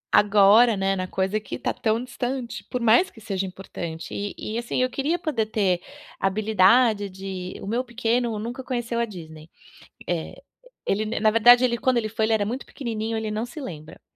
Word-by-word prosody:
Agora, 210 +3 +6
né, 195 0 +1
na 185 -1 -3
coisa 190 +3 -1
que 215 - -7
tá - - -2
tão 225 -1 0
distante, 250 -1 -4
por 250 - -3
mais 235 +9 +4
que - - -16
seja 195 -3 -3
importante. 170 -3 -7
E 205 0 -3 0.2
e, - - 0
assim, 235 +1 -3
eu - - +3
queria 290 +7 0
poder 245 -11 -1
ter 195 -5 +1 0.4
habilidade 210 +2 +3
de 190 -1 -6
o - - -6
meu 235 +5 -1
pequeno 235 -1 -1
nunca 240 +5 -5
conheceu 240 -2 -2
a 235 - +2
Disney. 160 -6 -11 0.6
É, 170 -2 -3 0.5
ele 210 +2 +1
na 220 +2 -2
na 215 0 +4
verdade, 240 +3 +6
ele 240 -1 +2
quando 255 0 +1
ele 220 -2 -1
foi, 220 +1 0
ele 225 - +1
era 205 -2 +1
muito 250 +5 -4
pequenininho, 225 -4 -4
ele 220 -1 -2
não 215 +2 -2
se 305 +5 -9
lembra. 155 - -9
220 Hz, 195 wpm, -24 LUFS, 195-240 Hz, 0.6 s, Agora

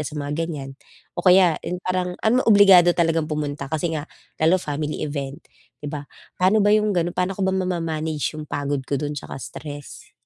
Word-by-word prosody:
sa 150 - -7
mga 145 0 -3
ganiyan, 140 -5 -6 0.5
o - - +2
kaya 180 -2 +5
'yung 180 - -4
parang, 180 -1 -1
alam 245 +4 +4
mo - - +1
obligado 195 -4 +7
talagang 165 -2 +1
pumunta 145 -2 -3
kasi 160 +1 -2
nga, 155 -1 -4 0.3
lalo 165 +4 +5
family 150 -3 -3
event 140 -2 -5 0.4
'di - - -3
ba. 145 -1 -6 0.3
Paano 200 +3 +4
ba 205 - +4
'yong 215 0 +3
gano'n, 175 0 0
paano 180 +1 -1
ko 195 - -1
ba 190 - +1
mama-manage 165 -5 -2
'yong 155 -1 -7
pagod 145 -1 -2
ko 140 - 0
do'n 145 +2 -3
'tsaka - - -7
stress? 145 +2 -9
160 Hz, 195 wpm, -22 LUFS, 145-185 Hz, 0.5 s, obligado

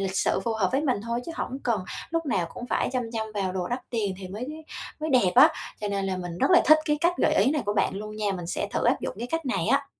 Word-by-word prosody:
lịch 190 -1 -2
sự - - +2
phù 230 - 0
hợp 205 -4 +1
với 270 - +2
mình 260 -8 0
thôi, 235 +1 -2
chứ 330 - -5
hổng 265 -4 -4
cần 220 -6 0 0.3
lúc 330 -1 -1
nào 185 -10 +1
cũng 245 - -6
phải 235 - 0
chăm 255 -1 0
chăm 220 -1 -2
vào 195 -3 -1
đồ 185 -1 -2
đắt 245 +2 -2
tiền 210 -5 -1
thì 190 -1 -7
mới 210 +7 -5 0.5
mới 310 +1 -2
đẹp 245 -9 +4
á. - - +9 0.3
Cho 210 - -2
nên 200 -1 -1
là 190 -1 -1
mình 175 -1 -6
rất - - +2
là 360 - +7
thích 310 0 +7
cái 300 -1 +1
cách 345 +2 +3
gợi - - +3
ý - - +4
này 295 -2 0
của 205 - +1
bạn 195 - +1
luôn 215 +1 -6
nha, 210 -2 0
mình 175 -3 -5
sẽ 180 - -2
thử - - -1
áp - - +3
dụng - - -4
cái 235 - -3
cách 325 -2 -2
này 255 - 0
á. - - +2
220 Hz, 300 wpm, -26 LUFS, 195-265 Hz, 0.5 s, á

